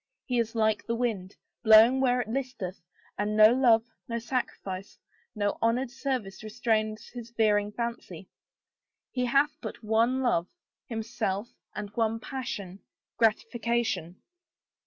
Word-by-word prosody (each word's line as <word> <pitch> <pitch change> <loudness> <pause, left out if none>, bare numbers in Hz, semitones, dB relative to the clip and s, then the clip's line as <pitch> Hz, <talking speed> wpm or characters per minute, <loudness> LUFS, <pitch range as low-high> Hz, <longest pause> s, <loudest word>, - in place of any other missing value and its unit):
He 245 -2 0
is 230 0 -1
like 220 -1 +2
the 230 - 0
wind, 215 -6 -2 0.3
blowing 230 +3 +7
where 250 -1 +3
it 230 - -6
listeth, 240 -7 -4 0.4
and 210 +1 0
no 215 +1 +8
love, 240 -3 +5 0.2
no 235 - -2
sacrifice, 210 -5 -4 0.4
no 205 -1 -1
honored 235 +2 +1
service 245 -7 -3
restrains 215 -1 -1
his 240 -1 -9
veering 210 -3 +2
fancy. 235 +1 -5 0.8
He 250 -1 -1
hath 280 +4 +2
but 240 - -7
one 230 +4 +2
love 175 -8 +1 0.2
— - - -65
himself, 220 -2 -2 0.3
and 205 -1 -5
one 225 0 0
passion 205 -8 -6 0.2
— - - -65
gratification." 225 -5 0
225 Hz, 135 wpm, -28 LUFS, 210-245 Hz, 0.8 s, no